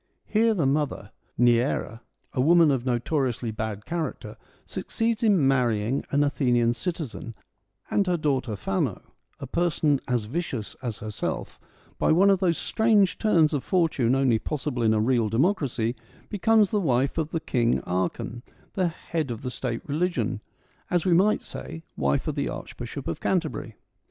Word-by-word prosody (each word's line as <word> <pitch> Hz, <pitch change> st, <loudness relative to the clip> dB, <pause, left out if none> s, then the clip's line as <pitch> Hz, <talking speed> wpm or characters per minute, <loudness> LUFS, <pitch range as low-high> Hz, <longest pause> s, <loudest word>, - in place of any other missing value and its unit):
Here 225 Hz, +1 st, +2 dB
the 165 Hz, -7 st, +1 dB
mother, 135 Hz, -7 st, -1 dB, 0.3 s
Neaera, 120 Hz, -1 st, +2 dB, 0.3 s
a 125 Hz, -, +1 dB
woman 165 Hz, +2 st, +5 dB
of 130 Hz, -2 st, -1 dB
notoriously 125 Hz, -1 st, 0 dB
bad 110 Hz, -1 st, -4 dB
character, 165 Hz, -2 st, -4 dB, 0.3 s
succeeds 225 Hz, -1 st, -2 dB
in 200 Hz, -, +4 dB
marrying 120 Hz, -2 st, +1 dB
an 145 Hz, +1 st, +2 dB
Athenian 120 Hz, -4 st, +2 dB
citizen, 130 Hz, -3 st, -5 dB, 0.6 s
and 200 Hz, -, +2 dB
her 180 Hz, -1 st, +2 dB
daughter 135 Hz, -7 st, 0 dB
Phand, 95 Hz, 0 st, -1 dB, 0.4 s
a -, -, -5 dB
person 155 Hz, -4 st, +1 dB
as 120 Hz, -4 st, 0 dB
vicious 130 Hz, -4 st, -4 dB
as 120 Hz, -5 st, -4 dB
herself, 105 Hz, -1 st, -4 dB, 0.4 s
by -, -, +3 dB
one 190 Hz, +5 st, +5 dB
of 195 Hz, -, +3 dB
those 175 Hz, -4 st, +2 dB
strange 220 Hz, -4 st, +2 dB
turns 165 Hz, -8 st, +3 dB
of 145 Hz, -, -1 dB
fortune 150 Hz, -9 st, +2 dB
only 130 Hz, -4 st, +3 dB
possible 145 Hz, -3 st, -3 dB
in 110 Hz, -1 st, +3 dB
a -, -, +2 dB
real 115 Hz, -1 st, +2 dB
democracy, 125 Hz, -, +1 dB, 0.3 s
becomes 215 Hz, 0 st, +3 dB
the 210 Hz, -, +1 dB
wife 135 Hz, -1 st, +1 dB
of 160 Hz, -1 st, -1 dB
the 165 Hz, -, -2 dB
King 120 Hz, -6 st, +1 dB
Archon, 95 Hz, +6 st, -2 dB, 0.3 s
the 185 Hz, -2 st, +1 dB
head 165 Hz, -3 st, -3 dB
of 115 Hz, 0 st, -5 dB
the 125 Hz, -, -3 dB
State 120 Hz, -2 st, -3 dB
religion, 145 Hz, -, -1 dB, 0.5 s
as 175 Hz, -2 st, +1 dB
we 180 Hz, -, +4 dB
might 195 Hz, +5 st, +3 dB
say, 165 Hz, -, -8 dB
wife 70 Hz, -1 st, 0 dB
of -, -, 0 dB
the -, -, -2 dB
Archbishop -, -, -7 dB
of 85 Hz, -, -3 dB
Canterbury. 155 Hz, -, -1 dB
140 Hz, 155 wpm, -26 LUFS, 120-175 Hz, 0.6 s, woman